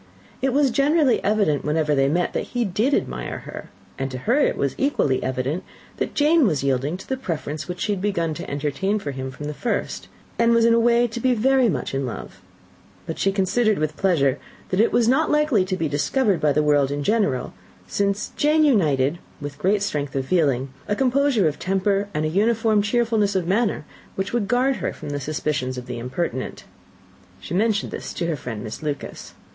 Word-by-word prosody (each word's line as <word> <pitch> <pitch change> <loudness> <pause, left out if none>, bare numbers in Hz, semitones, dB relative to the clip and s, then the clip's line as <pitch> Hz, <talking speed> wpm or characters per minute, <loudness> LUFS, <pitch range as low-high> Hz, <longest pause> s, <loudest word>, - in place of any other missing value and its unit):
It 265 0 +1
was 275 0 +3
generally 280 0 +3
evident, 200 -8 +1
whenever 150 0 +1
they 135 -1 +3
met, 175 +5 0
that - - -4
he 240 - +2
did 220 +9 +1
admire - - -3
her; - - -8 0.3
and 135 0 -2
to 130 - -5
her 235 - +1
it - - +2
was 140 -1 0
equally 205 - +1
evident 130 +7 -2 0.3
that - - -3
Jane 305 -2 +4
was 150 -7 0
yielding 140 +5 0
to 190 - -12
the 265 - -1
preference 155 - -4
which 180 0 -6
she 210 - 0
had 195 -3 -2
begun 170 -6 0
to - - -7
entertain 145 +8 -1
for 150 -9 -4
him 130 0 -5
from 130 +3 -8
the 150 - -3
first, 240 - -3 0.3
and 235 0 +4
was 230 0 +4
in 230 - +5
a 230 - +4
way 235 +1 +4
to 235 +1 -6
be 255 +1 +2
very 260 +1 +3
much - - -3
in 135 -1 -1
love; 120 - -8 0.6
but 160 - -5
she 195 - +2
considered 205 +3 +1
with 155 0 -1
pleasure 145 -8 +2 0.3
that 185 - 0
it 225 - +4
was 235 -2 +3
not 260 +3 +3
likely 300 -9 +3
to 185 0 -2
be 165 - 0
discovered 175 - +1
by 150 - +3
the 150 +2 +2
world 145 -2 +3
in 145 0 -3
general, 200 - 0 0.3
since 200 0 -1
Jane 305 +1 +3
united 160 - +2 0.2
with 145 0 -7
great 200 +2 +2
strength 145 -9 -3
of 135 -1 -1
feeling, 140 -6 +1 0.2
a 205 - 0
composure 260 - +2
of 150 - -3
temper 195 +1 0
and 155 +1 0
an 155 - -2
uniform 220 +1 +3
cheerfulness 215 -2 +1
of 185 -3 +1
manner, 200 -3 0 0.3
which 195 +2 -3
would 230 -4 0
guard 255 +3 +2
her - - -3
from - - -8
the 145 - -2
suspicions 140 -3 -2
of 125 - -6
the 125 -1 -5
impertinent. 130 +1 -4 0.8
She - - -7
mentioned 210 +2 +1
this - - -6
to 170 - -2
her 165 -2 0
friend, 120 -5 -6
Miss 110 - -7
Lucas. 150 -2 -5
185 Hz, 205 wpm, -23 LUFS, 145-230 Hz, 0.8 s, in